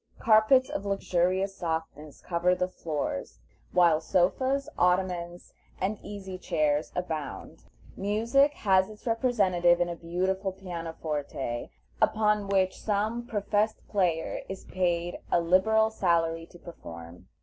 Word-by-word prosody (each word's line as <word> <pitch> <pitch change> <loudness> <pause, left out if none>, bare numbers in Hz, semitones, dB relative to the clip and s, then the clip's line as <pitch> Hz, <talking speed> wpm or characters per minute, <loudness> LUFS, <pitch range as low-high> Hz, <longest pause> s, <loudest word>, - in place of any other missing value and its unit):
Carpets 225 +4 +5
of 195 - -4
luxurious 190 -1 0
softness 160 -4 -5
cover 180 +1 +1
the 180 - 0
floors, 150 - -4 0.3
while 170 -3 +4
sofas, 260 +12 +1
ottomans, 180 -1 0 0.3
and 200 +3 -1
easy 190 -2 -7
chairs 155 -4 0
abound. 160 -5 -5 0.3
Music 230 +8 +2
has 190 -1 +3
its 215 -1 -13
representative 200 -8 +2
in 175 0 +1
a 170 - -4
beautiful 185 +3 -2
pianoforte, 160 -8 -4 0.3
upon 210 -1 +2
which 190 -1 +1
some 220 +3 -1
professed 210 0 -1
player 175 -5 0
is 190 0 -7
paid 175 -1 -1
a - - +4
liberal 220 +6 +3
salary 165 -4 +1
to 175 - -15
perform. 85 - -11
185 Hz, 115 wpm, -28 LUFS, 170-205 Hz, 0.3 s, Carpets